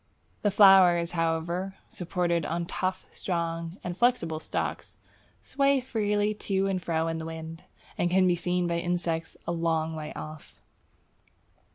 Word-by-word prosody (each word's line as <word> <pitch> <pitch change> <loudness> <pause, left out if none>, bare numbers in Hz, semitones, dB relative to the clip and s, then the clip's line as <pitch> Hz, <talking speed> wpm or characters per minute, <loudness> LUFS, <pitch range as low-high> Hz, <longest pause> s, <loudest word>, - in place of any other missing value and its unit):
The 205 - +2
flowers, 190 -4 +6
however, 170 +3 -1
supported 175 -1 -1
on 170 +3 -2
tough, 185 +2 -3
strong, 170 -1 -3
and 175 -1 -4
flexible 190 -9 +1
stalks, - - -4 0.5
sway 275 0 +2
freely 210 -4 0
to 195 -2 -1
and 190 -2 -1
fro 165 -1 0
in 165 0 -2
the 160 - -5
wind, 160 +1 -8 0.3
and 175 - +2
can 185 +1 +4
be 180 - +4
seen 180 +1 0
by 170 0 0
insects 170 -2 -2
a 170 - -2
long 165 -1 0
way 155 -1 -6
off. 155 0 -9
175 Hz, 145 wpm, -28 LUFS, 165-190 Hz, 0.5 s, flowers